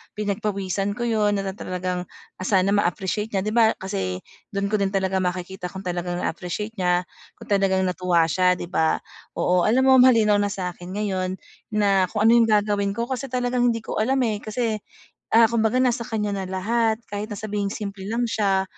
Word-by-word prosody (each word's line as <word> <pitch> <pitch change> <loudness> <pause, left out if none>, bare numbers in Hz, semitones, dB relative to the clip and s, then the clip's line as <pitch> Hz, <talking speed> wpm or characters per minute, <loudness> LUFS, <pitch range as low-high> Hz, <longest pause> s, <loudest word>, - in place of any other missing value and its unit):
pinagpawisan 200 -1 -2
ko 240 - -4
yun, 215 -3 +2
na 195 -1 -2
talagang 180 -1 -4 0.3
sana 190 0 +2
ma-appreciate 200 +2 -1
niya. 190 - +1
'Di 215 - -2
ba 225 -1 +4
kasi 95 - -4 0.2
dun 200 -1 -3
ko 215 - +2
din 195 0 0
talaga 190 0 +1
makikita 180 0 -3
kung 190 +2 -8
talagang 175 0 -3
na-appreciate 180 +6 -3
niya 180 0 +2 0.3
kung - - -13
talagang 190 -1 +2
natuwa 180 -2 +2
siya 180 0 +3
di - - -6
ba. 160 -3 +2 0.4
Oo 180 +1 +2
alam 255 +4 +3
mo 260 - +7
malinaw 225 -5 +5
na 205 - +1
sa 185 -3 -3
akin 180 +2 -9
ngayon 190 -3 -1 0.4
na 195 -3 +3
kung 210 +3 -1
ano 225 - +7
yung 230 - +4
gagawin 205 -1 +1
ko 235 +3 -3
kasi 260 +1 -3
talagang 245 0 0
hindi 230 -1 -2
ko - - -3
alam, 265 +4 +1
eh, 215 -3 -1
kasi, 220 -1 -2 0.5
ah, 225 0 +7
kumbaga 230 +1 +1
nasa 245 -2 +2
kanya 210 -2 -2
na 190 - -3
lahat. 220 +4 +1
Kahit 210 +2 -5
na 205 - -5
sabihing 205 -2 -2
simple 200 -2 -6
lang 235 +2 0
siya, 195 -4 +1
200 Hz, 190 wpm, -23 LUFS, 185-220 Hz, 0.5 s, mo